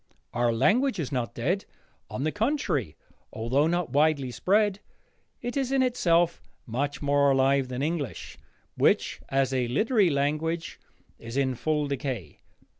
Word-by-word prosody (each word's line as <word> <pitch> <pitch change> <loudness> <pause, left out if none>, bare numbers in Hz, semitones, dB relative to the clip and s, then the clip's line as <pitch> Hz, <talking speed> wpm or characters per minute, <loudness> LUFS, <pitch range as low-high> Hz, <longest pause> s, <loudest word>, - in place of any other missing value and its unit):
Our 120 0 +2
language 225 - +2
is 150 -6 -3
not 125 -4 -2
dead; 175 +12 -1 0.4
on 110 +5 -4
the 155 - 0
contrary, 210 - -1 0.4
although 130 +7 +1
not 175 -4 -1
widely 145 -2 +2
spread, 205 - +2 0.6
it 245 0 -3
is 270 -2 -1
in 270 -1 +3
itself 175 -9 +2 0.2
much 140 +6 -3
more 140 0 +3
alive 135 0 +3
than 125 +1 -3
English, 155 -4 -4 0.4
which - - +2
as 135 -1 +1
a 125 -2 +1
literary 210 - +2
language 155 +4 -1 0.4
is 115 +3 -7
in 135 -2 +1
full 150 +3 -1
decay. 130 - -4
145 Hz, 140 wpm, -27 LUFS, 130-175 Hz, 0.6 s, in